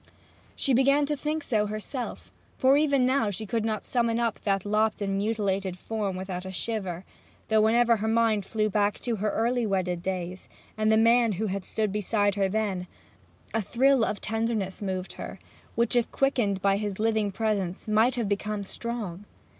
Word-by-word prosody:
She 275 - +1
began 275 +3 +4
to 295 +1 -1
think 300 +2 -2
so 215 -6 +1
herself; 215 +5 -5 0.3
for 265 +1 +5
even 285 -3 +3
now 255 -4 +2
she 210 +2 -4
could 225 +2 -1
not 215 -1 -1
summon 235 -2 +1
up 235 -1 0
that 195 -1 0
lopped 215 +1 +1
and 195 -1 -1
mutilated 195 -3 -1
form 205 -1 -3
without 185 -1 -5
a 190 - -6
shiver, 190 -1 -3 0.4
though 220 -1 +4
whenever 230 +1 +4
her 215 +1 -2
mind 225 -2 +2
flew 215 +2 0
back 205 0 +1
to 235 -3 -1
her 210 +2 0
early 240 +3 +1
wedded 180 -3 -1
days, 185 0 -4 0.3
and 215 0 +2
the 220 - +5
man 230 0 +4
who 205 +4 -2
had 195 -2 -3
stood 215 -2 -1
beside 205 0 +1
her 195 -1 +1
then, 195 -3 -1 0.7
a 225 - +1
thrill 260 +4 +3
of 210 -2 -1
tenderness 220 -3 -2
moved 190 -2 -3
her, - - -7 0.4
which 235 +1 +1
if 240 -1 +2
quickened 220 -8 +1
by 195 0 +3
his 205 -2 -3
living 220 -2 +1
presence 200 -2 -2
might 220 +4 +3
have 235 -4 -1
become 205 +1 -2
strong. 205 -3 -5
215 Hz, 180 wpm, -27 LUFS, 195-230 Hz, 0.7 s, for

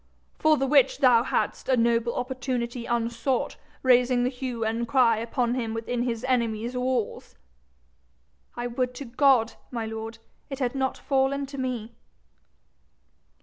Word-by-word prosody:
'For 310 0 +4
the 270 - 0
which 275 -1 +4
thou 250 -4 +5
hadst 250 - -2
a 260 - +4
noble 235 0 +2
opportunity 250 -2 -3
unsought, 235 +2 -1 0.3
raising 250 -1 +4
the 250 - +1
hue 250 -3 -4
and 230 +2 -1
cry 235 -3 +4
upon 235 +2 -1
him 230 -3 -2
within 235 +2 -2
his 240 -1 -2
enemy's 235 -2 0
walls!' 250 -2 -2 1.2
'I 240 - -4
would 250 +1 -2
to 280 - -6
God, 250 -2 +3 0.2
my 230 -3 -3
lord, 220 +1 -6 0.3
it 270 - -5
had 250 -3 -1
not 265 -1 -1
fallen 275 +1 0
to 275 0 -8
me.' 240 -3 -3
245 Hz, 145 wpm, -26 LUFS, 235-260 Hz, 1.2 s, thou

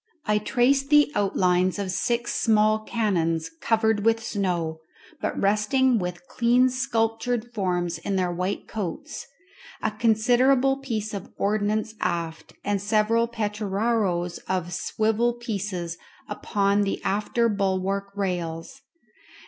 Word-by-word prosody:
I 210 0 +2
traced 270 +5 +2
the 295 -1 +5
outlines 185 -2 +2
of 200 -2 -2
six 235 +5 -1
small 215 -1 +3
cannons 165 -7 0
covered 220 -2 +2
with 225 0 +2
snow, 175 -7 -2 0.4
but - - -2
resting 215 +5 +2
with 180 -1 -5
clean 245 +2 +3
sculptured 235 -1 -1
forms 180 -5 -1
in 195 +4 -2
their 180 -2 +1
white 180 +3 -3
coats; 220 - -5 0.5
a 220 - -1
considerable 245 +5 +3
piece 220 -6 -4
of 200 0 -6
ordnance 215 +1 0
aft, 165 -1 -3
and 205 -1 0
several 220 +2 +2
petararoes 210 -4 -1
or 180 -2 -1
swivel 220 +5 0
pieces 195 -7 -4 0.3
upon 200 -1 0
the 200 -1 -1
after 210 +4 +1
bulwark 195 -1 -1
rails. 180 +5 -3
210 Hz, 115 wpm, -25 LUFS, 185-230 Hz, 0.5 s, the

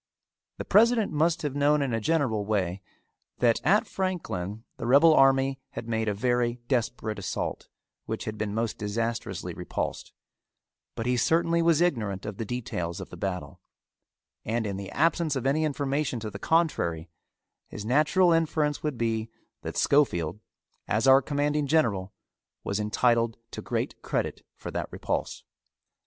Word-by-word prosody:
The - - -5
president 225 +1 +4
must 160 +2 +1
have 145 -3 -1
known 145 +1 +3
in 130 -4 -2
a 115 - +1
general 130 -7 +1
way, 95 -3 -1 0.6
that 120 -2 +3
at 200 +7 +4
Franklin 110 - -3
the - - -4
rebel 145 +6 +7
army 135 -1 +4
had 115 - -6
made 110 -1 -1
a 105 - +1
very 120 +2 +1
desperate 120 -4 -1
assault 95 - -4 0.4
which - - -4
had 110 - -4
been 105 -1 -3
most 115 0 -2
disastrously 115 -1 -3
repulsed, - - -4 0.8
but 115 - -4
he 125 0 +1
certainly 170 +5 +2
was 165 -1 +3
ignorant 110 - 0
of 105 -2 -5
the 115 - -3
details 100 -8 -4
of - - -8
the - - -8
battle, 90 -2 -5 0.8
and 115 +1 -1
in 100 -2 -3
the 95 0 -6
absence 160 0 +1
of 130 -1 -3
any 145 +4 +2
information 140 -3 -1
to 110 -1 -5
the 100 - -8
contrary, 90 - +1 0.6
his 105 - -7
natural 155 +8 +4
inference 155 -2 +1
would 150 -5 -2
be 115 -1 -1 0.3
that - - -6
Schofield, 100 - +2 0.5
as 110 +4 +1
our 135 +1 +8
commanding 145 +1 0
general, 110 -12 +1 0.5
was 100 - -2
entitled 115 +2 +1
to - - -6
great - - -3
credit - - -2
for - - -7
that - - -3
repulse. - - -3
125 Hz, 155 wpm, -27 LUFS, 105-150 Hz, 0.8 s, our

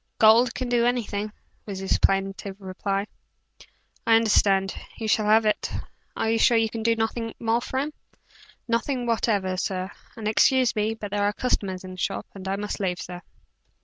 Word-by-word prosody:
"Gold 230 +2 +6
can 255 - -3
do 240 -1 +2
anything," 215 -4 -1 0.4
was 200 -2 -5
his 190 0 0
plaintive 195 0 0
reply. 195 +1 -2 1.0
"I 225 - +7
understand. 200 -3 +3 0.2
You 220 - -4
shall 215 0 +2
have 220 +1 +5
it. 210 - +1 0.5
Are - - 0
you 225 - +2
sure 235 +1 +5
you 225 -1 +1
can 225 - -4
do 230 +1 +2
nothing 225 0 -2
more 230 +1 +1
for 260 - -4
him?" 290 +3 -1 0.7
"Nothing 245 +2 0
whatever, 205 -5 0
sir; 185 +1 -2 0.3
and 220 -2 -4
excuse 255 +3 +4
me, 215 +1 0
but 205 -3 -7
there 205 0 0
are 205 0 +2
customers 195 -6 -1
in 185 - -8
the 185 - -9
shop, 195 +1 -2
and 195 -1 -8
I 195 - 0
must 205 +1 -4
leave, 180 -3 -1
sir." 175 0 -7
215 Hz, 180 wpm, -25 LUFS, 195-230 Hz, 1.0 s, I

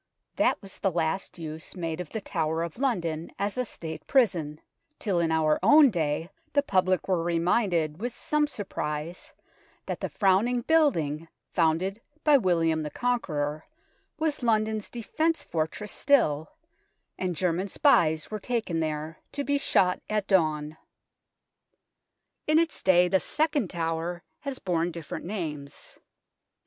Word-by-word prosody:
That - - +2
was 195 - -7
the 195 - +2
last 170 +3 -1
use 160 0 -6
made 165 -1 -3
of 170 - -8
the 220 - -4
Tower 160 -3 -1
of 170 +5 -6
London 170 - -1
as 200 0 -1
a 255 - 0
State 160 -8 -7
prison 170 - +2 0.4
till 195 -5 0
in 165 -1 +1
our 155 -1 +2
own 290 -3 +7
day 160 0 -1 0.2
the 285 - +3
public 185 -5 +1
were 185 -3 +1
reminded, 170 -1 +1
with 245 +2 -2
some 300 +5 0
surprise, 170 - -4 0.5
that - - -4
the - - -3
frowning 215 +5 +2
building 165 - +2 0.3
founded 180 +5 +1 0.2
by 300 -1 +6
William 165 -5 +2
the 150 - -3
Conqueror 155 -9 -1 0.5
was 315 -3 -1
London's 220 -2 +1
defensive 315 +8 -1
fortress 160 +6 -2
still, 160 - +2 0.7
and 180 -2 -1
German 180 +3 0
spies 160 -4 +3
were 215 - -3
taken 220 -7 -1
there 155 0 -3
to 285 - -2
be 285 0 +1
shot 180 -8 +2
at 210 -2 0
dawn. 155 -5 +1 1.7
In 310 +1 +4
its 330 -1 +1
day 180 -1 +5
the 190 +1 +3
second 295 - 0
tower 165 +1 -3 0.2
has 275 -2 -5
borne 175 -2 0
different 165 -3 -7
names. 150 -7 -6
180 Hz, 140 wpm, -27 LUFS, 160-225 Hz, 1.7 s, own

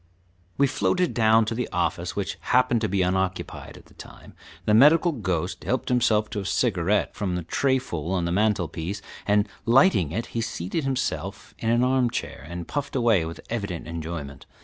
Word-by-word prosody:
We 140 - +5
floated 180 +5 +1
down 110 -1 +4
to 110 - -2
the 125 +1 -3
office, - - -1
which - - -3
happened 120 -2 +2
to 110 - 0
be 95 0 +1
unoccupied 95 0 -2
at - - -16
the - - -21
time. - - -13 0.3
The 105 - +3
medical 150 +9 +6
ghost 95 - -3
helped - - -1
himself 110 -4 +2
to 105 - -2
a 100 - -5
cigarette 100 -2 +1
from 95 -4 -2
a 90 - -4
trayful 110 - -1
on 90 -3 0
the 85 - -1
mantel 100 -2 +2
piece, 90 +7 -5 0.2
and 105 +1 +3 0.2
lighting 115 - +4
it, 115 +7 -2
he 115 - -1
seated 110 - -3
himself 135 -2 -3
in 115 - -1
an 120 +1 +3
armchair, 125 -2 0
and 85 0 -6
puffed 140 -1 -4
away 115 -9 +3
with 80 +1 -7
evident 100 -7 -3
enjoyment. 80 -4 -6
105 Hz, 180 wpm, -25 LUFS, 90-125 Hz, 0.3 s, medical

